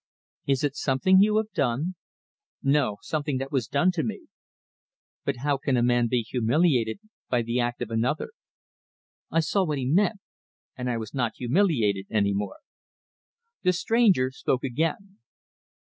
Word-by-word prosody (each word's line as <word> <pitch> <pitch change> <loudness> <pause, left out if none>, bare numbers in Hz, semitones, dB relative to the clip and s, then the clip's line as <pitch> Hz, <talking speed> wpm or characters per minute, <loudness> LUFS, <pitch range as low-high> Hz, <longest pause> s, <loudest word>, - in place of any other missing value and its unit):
"Is 135 -1 +1
it 145 -1 0
something 150 +9 +3
you 210 +2 +4
have 220 0 -1
done?" 140 +10 -1 0.7
"No. 135 -7 +2
Something 145 +1 -2
that 135 +1 -5
was 130 -6 0
done 145 +9 +2
to 175 -3 -1
me." 115 -7 -5 1.0
"But - - 0
how 145 -1 +2
can 135 -2 0
a 120 - +2
man 120 -1 +3
be 120 0 0
humiliated 125 - +1 0.3
by 120 -2 +1
the 115 +2 -1
act 120 0 -1
of 115 - -8
another?" 120 - -1 1.0
I 165 - +2
saw 195 +5 +1
what 155 -5 -1
he 130 - -2
meant; 200 - +2 0.6
and 125 -1 -3
I 120 - -1
was 110 -1 -6
not 120 -4 -1
humiliated 120 - +1
any 100 -2 +1
more. 105 - -4 1.0
The 180 - +3
stranger 185 - +3
spoke 130 -1 -1
again. 165 - -2
135 Hz, 155 wpm, -26 LUFS, 120-165 Hz, 1.0 s, you